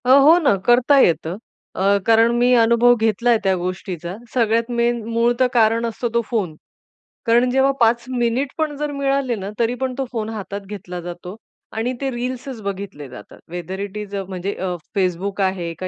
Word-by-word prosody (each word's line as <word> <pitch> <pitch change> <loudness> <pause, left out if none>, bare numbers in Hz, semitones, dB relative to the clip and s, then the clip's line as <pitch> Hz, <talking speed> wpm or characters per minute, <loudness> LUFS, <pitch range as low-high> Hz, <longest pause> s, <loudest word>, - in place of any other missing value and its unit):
अ, - - 0
हो 280 +5 +7
ना, 280 - +3
करता 250 +4 +5
येतं 170 -4 +2 0.4
अ, 200 +2 +3
कारण 225 +1 +5
मी 245 +1 +3
अनुभव 235 +1 +5
घेतला 225 +1 0
आहे 230 -2 +4
त्या 190 -1 +2
गोष्टीचा. 180 -1 -5 0.2
सगळ्यात 230 0 +1
मेन 235 0 +1
मूळ 230 +1 +2
तर 255 - +4
कारण 230 0 +3
असतो 235 +1 -3
तो 235 - +3
फोन. 195 -10 -1 0.7
कारण 240 +2 +3
जेव्हा 265 +1 +3
5 235 0 +3
मिनिट 245 +2 0
पण 310 -2 -1
जर 295 0 -2
मिळाले 275 -3 0
ना, 195 -2 -6
तरी 235 +1 +1
पण 260 -1 -1
तो 270 - -1
फोन 220 -3 -3
हातात 205 -2 -6
घेतला 185 -3 -7
जातो 175 +2 -8 0.4
आणि 240 +3 -1
ते 270 - 0
रील्सच 250 0 -5
बघितले 195 -7 -6
जातात 125 - -12
वेदर 180 +2 -5
इट 200 +1 -5
इस 210 -1 -7
अ, 195 - -2
म्हणजे 190 +1 -4
अ, 190 - -4 0.3
Facebook 190 +2 -1
आहे 180 -3 -2
का 185 - -3
225 Hz, 190 wpm, -20 LUFS, 190-245 Hz, 0.7 s, हो